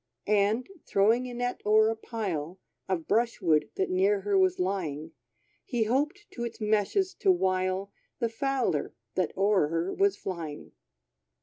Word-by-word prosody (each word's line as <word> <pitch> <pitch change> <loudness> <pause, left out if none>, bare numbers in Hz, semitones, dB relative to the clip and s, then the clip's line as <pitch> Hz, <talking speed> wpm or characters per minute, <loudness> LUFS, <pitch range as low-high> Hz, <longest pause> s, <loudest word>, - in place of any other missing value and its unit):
And, 210 +3 +2 0.2
throwing 225 +6 +3
a - - -7
net 245 0 -2
o'er 215 +1 +5
a - - -3
pile 190 -7 -4 0.3
Of 175 -4 -1
brush 230 +2 +1
wood 160 -5 +2
that 190 - -1
near 195 +2 +2
her 200 0 0
was 185 -1 +3
lying, 165 -5 -2 0.5
He 235 -2 0
hoped 295 - 0
to 235 - -5
its 235 -1 -5
meshes 215 - +1
to 390 - +4
wile 185 - 0 0.3
The 235 - 0
fowler, 255 - -1 0.2
that 185 -4 0
o'er 195 -5 +3
her 165 +4 -1
was 395 0 +2
flying. 165 -5 -6
205 Hz, 150 wpm, -28 LUFS, 185-235 Hz, 0.5 s, o'er